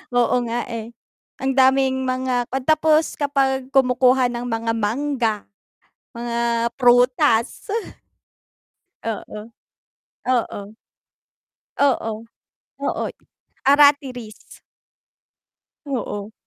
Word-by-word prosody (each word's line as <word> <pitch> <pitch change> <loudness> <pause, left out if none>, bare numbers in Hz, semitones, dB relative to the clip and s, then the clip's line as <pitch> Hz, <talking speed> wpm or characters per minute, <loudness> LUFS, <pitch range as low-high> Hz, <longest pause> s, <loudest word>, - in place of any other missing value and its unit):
Oo 245 0 +3
nga, 235 +1 -2
eh. 230 0 -6 0.5
Ang 265 0 0
daming 265 0 +3
mga 255 -1 -1
'pag 265 0 -3
tapos 315 +2 +2
kapag 270 -2 0
kumukuha 255 -1 +4
ng 240 0 -4
mga 230 -1 -1
mangga, 230 +1 0 0.8
mga 235 0 -1
prutas. 245 - +3 1.3
Oo. 215 -1 -5 0.9
Oo. 245 -5 0 1.2
Oo. 265 -5 +2 0.7
Oo, - - -1 0.6
aratilis. 275 -6 +3 1.4
Oo. 215 -6 -4
250 Hz, 75 wpm, -21 LUFS, 235-270 Hz, 1.4 s, kumukuha